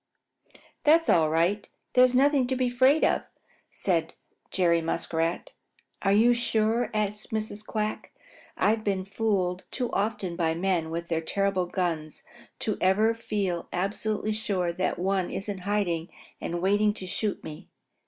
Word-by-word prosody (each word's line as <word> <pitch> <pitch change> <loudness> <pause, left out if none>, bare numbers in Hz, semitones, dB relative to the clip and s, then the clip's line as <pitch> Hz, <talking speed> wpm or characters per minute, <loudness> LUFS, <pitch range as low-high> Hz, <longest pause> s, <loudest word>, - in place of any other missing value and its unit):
"It's 325 +2 +4
all 160 -3 +4
right. 170 +6 +1 0.2
There's 255 0 +5
nothing 275 -1 +4
to 260 - 0
be 255 -1 +1
afraid 260 +5 +4
of," - - +2 0.5
said 165 -4 -1 0.3
Jerry 170 -3 +2
Muskrat. 165 - -1 0.5
"Are 195 - +2
you 225 +4 +5
sure?" 230 0 +1
asked 210 0 -2
Mrs. 215 -1 -3
Quack 215 0 -3
anxiously. - - -25
"I've 220 +1 +2
been 195 -3 -1
fooled 195 -3 -1
too 250 -2 -3
often 200 -4 -1
by 165 -2 0
men 175 -2 0
with 170 +1 -4
their 165 -1 0
terrible 195 +1 0
guns 165 -5 -3 0.4
to 215 - -1
ever 210 +5 +3
feel 200 -6 -3
absolutely 210 +3 -1
sure 190 -5 -1
that 185 +2 -1
one 190 0 0
isn't 195 0 -4
hiding 180 -4 -1 0.3
and 175 +1 -3
waiting 205 +2 +3
to 190 - -7
shoot 200 +3 -2
me." 150 - -9
200 Hz, 145 wpm, -27 LUFS, 175-220 Hz, 0.5 s, There's